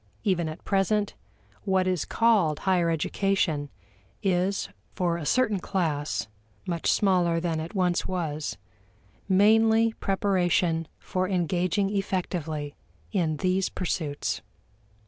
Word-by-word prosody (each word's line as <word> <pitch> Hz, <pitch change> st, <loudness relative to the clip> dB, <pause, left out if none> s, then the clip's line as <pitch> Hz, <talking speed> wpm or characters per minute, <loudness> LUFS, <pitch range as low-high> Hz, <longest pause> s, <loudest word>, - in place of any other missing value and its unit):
Even 175 Hz, -6 st, +1 dB
at 155 Hz, -, -9 dB
present, 205 Hz, +1 st, +1 dB, 0.5 s
what 190 Hz, -2 st, +1 dB
is 185 Hz, -4 st, 0 dB
called 205 Hz, -10 st, +3 dB
higher 180 Hz, -3 st, +2 dB
education 165 Hz, -2 st, 0 dB, 0.5 s
is 190 Hz, 0 st, +1 dB, 0.3 s
for 175 Hz, -2 st, +1 dB
a 155 Hz, -4 st, -5 dB
certain 220 Hz, -6 st, +2 dB
class 155 Hz, -, -1 dB, 0.4 s
(much 170 Hz, -3 st, 0 dB
smaller 180 Hz, -4 st, +2 dB
than 165 Hz, -2 st, -1 dB
it 165 Hz, +6 st, -6 dB
once 180 Hz, -2 st, +1 dB
was) 155 Hz, -5 st, -3 dB, 0.7 s
mainly 220 Hz, +3 st, +5 dB
preparation 180 Hz, -4 st, +1 dB
for 185 Hz, 0 st, -2 dB
engaging 185 Hz, +2 st, +1 dB
effectively 175 Hz, -7 st, -2 dB, 0.4 s
in 155 Hz, -3 st, 0 dB
these 185 Hz, +4 st, +1 dB
pursuits. 145 Hz, -, -2 dB
180 Hz, 105 wpm, -27 LUFS, 165-195 Hz, 0.7 s, mainly